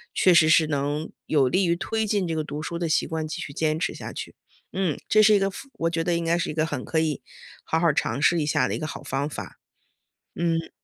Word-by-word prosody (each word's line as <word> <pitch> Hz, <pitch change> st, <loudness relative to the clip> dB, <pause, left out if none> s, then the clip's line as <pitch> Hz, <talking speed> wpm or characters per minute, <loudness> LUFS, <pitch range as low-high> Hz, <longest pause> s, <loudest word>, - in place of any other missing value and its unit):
确 185 Hz, -, +5 dB
实 170 Hz, -2 st, +6 dB
是 155 Hz, 0 st, +5 dB
能 145 Hz, +1 st, -2 dB, 0.2 s
有 135 Hz, -4 st, +3 dB
利 190 Hz, +7 st, +2 dB
于 170 Hz, -1 st, +2 dB
推 220 Hz, +5 st, -2 dB
进 200 Hz, -3 st, 0 dB
这 165 Hz, -, -2 dB
个 155 Hz, -, -1 dB
读 150 Hz, 0 st, -6 dB
书 170 Hz, +1 st, -4 dB
的 170 Hz, -1 st, -1 dB
习 155 Hz, -, +1 dB
惯 160 Hz, -1 st, -3 dB
继 155 Hz, -, -5 dB
续 -, -, -6 dB
坚 155 Hz, +2 st, 0 dB
持 -, -, -1 dB
下 -, -, -7 dB
去， -, -, -7 dB, 0.4 s
嗯， 185 Hz, -6 st, 0 dB
这 215 Hz, 0 st, +6 dB
是 215 Hz, -, +6 dB
一 205 Hz, -, +5 dB
个， 195 Hz, 0 st, +1 dB
非 275 Hz, -, -9 dB
我 165 Hz, -7 st, -1 dB
觉 165 Hz, -1 st, -1 dB
得 175 Hz, +1 st, 0 dB
应 170 Hz, -, -1 dB
该 170 Hz, +1 st, +2 dB
是 175 Hz, -, -2 dB
一 -, -, -5 dB
个 155 Hz, +1 st, 0 dB
很 145 Hz, -5 st, -4 dB
可 160 Hz, -, 0 dB
以 155 Hz, -4 st, -1 dB, 0.4 s
好 160 Hz, -, 0 dB
好 170 Hz, -, +3 dB
儿 150 Hz, -, +4 dB
尝 140 Hz, -, 0 dB
试 170 Hz, +3 st, +4 dB
一 150 Hz, -, 0 dB
下 150 Hz, -, +2 dB
的 -, -, -2 dB
一 -, -, -3 dB
个 155 Hz, -, -4 dB
好 155 Hz, -, -6 dB
方 140 Hz, +2 st, -2 dB
法。 150 Hz, -, -8 dB, 0.8 s
嗯。 165 Hz, -1 st, -1 dB
160 Hz, 295 characters per minute, -25 LUFS, 155-175 Hz, 0.8 s, 实